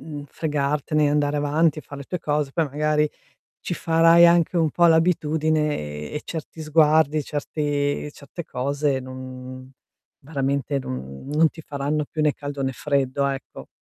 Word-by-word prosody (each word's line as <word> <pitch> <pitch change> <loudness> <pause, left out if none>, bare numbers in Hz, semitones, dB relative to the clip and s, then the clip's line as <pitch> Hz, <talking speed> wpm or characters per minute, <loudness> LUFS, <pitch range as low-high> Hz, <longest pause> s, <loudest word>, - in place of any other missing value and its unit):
mhmm, 145 -2 -7
fregartene, 150 0 0
andare 145 0 +1
avanti, 150 +1 +2
far 145 -1 -10
le 140 - -8
tue 180 - -4
cose, 150 -3 -1
poi 165 - +1
magari 150 +1 +1 0.5
ci 175 - -3
farai 165 +1 +5
anche 170 +1 +3
un 160 -3 +2
po' 170 +4 +4
l'abitudine 155 -2 +2 0.4
e - - -7
e 150 - -2
certi 160 0 -7
sguardi, 155 -1 +3
certi 145 0 -2
certe 150 +4 -9
cose 140 +1 -1
non 130 0 -9 0.5
veramente 140 -1 -1
non 65 - -7
non 155 +1 +4
ti 165 - -11
faranno 145 +1 -2
più 155 - -1
né 150 - +3
caldo 145 -1 -5
né 135 0 -1
freddo, 140 +1 0
ecco. 135 -1 -5
150 Hz, 150 wpm, -23 LUFS, 140-155 Hz, 0.5 s, farai